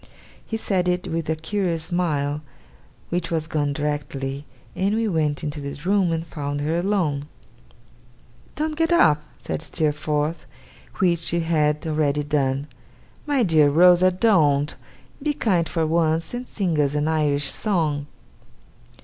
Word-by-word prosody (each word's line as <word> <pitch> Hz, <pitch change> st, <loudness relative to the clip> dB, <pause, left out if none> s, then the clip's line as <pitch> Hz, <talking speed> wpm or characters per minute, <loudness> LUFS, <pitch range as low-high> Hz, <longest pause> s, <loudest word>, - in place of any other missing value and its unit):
He 225 Hz, -, -2 dB
said 190 Hz, -4 st, 0 dB
it 180 Hz, 0 st, 0 dB
with 165 Hz, -1 st, -3 dB
a 160 Hz, -, +2 dB
curious 165 Hz, 0 st, -2 dB
smile, 150 Hz, -5 st, -1 dB, 0.7 s
which 175 Hz, -1 st, -2 dB
was 160 Hz, -2 st, -1 dB
gone 150 Hz, -2 st, -1 dB
directly; 140 Hz, -1 st, -3 dB, 0.3 s
and 200 Hz, +3 st, +1 dB
we 225 Hz, 0 st, +1 dB
went 155 Hz, -6 st, 0 dB
into 145 Hz, 0 st, -4 dB
the 140 Hz, 0 st, -6 dB
room 195 Hz, -3 st, +3 dB
and 165 Hz, 0 st, -2 dB
found 145 Hz, -2 st, -4 dB
her 155 Hz, +3 st, 0 dB
alone. 170 Hz, -6 st, 0 dB, 1.3 s
'Don't 310 Hz, 0 st, -2 dB
get 325 Hz, +1 st, +1 dB
up,' 155 Hz, -, +5 dB, 0.2 s
said -, -, -3 dB
Steerforth 150 Hz, +1 st, -1 dB, 0.5 s
(which 175 Hz, -3 st, +2 dB
she 170 Hz, +1 st, -1 dB
had 150 Hz, -2 st, +1 dB
already 150 Hz, -2 st, +1 dB
done)' 140 Hz, -2 st, 0 dB, 0.6 s
my 280 Hz, -4 st, +2 dB
dear 155 Hz, -6 st, +4 dB
Rosa, 180 Hz, +4 st, +6 dB
don't! 160 Hz, -8 st, +2 dB, 0.5 s
Be 295 Hz, 0 st, -1 dB
kind 180 Hz, -10 st, +1 dB
for 165 Hz, -2 st, 0 dB
once, 160 Hz, +1 st, +1 dB
and 245 Hz, +1 st, -5 dB
sing 175 Hz, -7 st, -1 dB
us 145 Hz, 0 st, 0 dB
an 150 Hz, +1 st, +1 dB
Irish 145 Hz, -3 st, +1 dB
song. 155 Hz, -8 st, 0 dB
160 Hz, 140 wpm, -23 LUFS, 145-180 Hz, 1.3 s, Rosa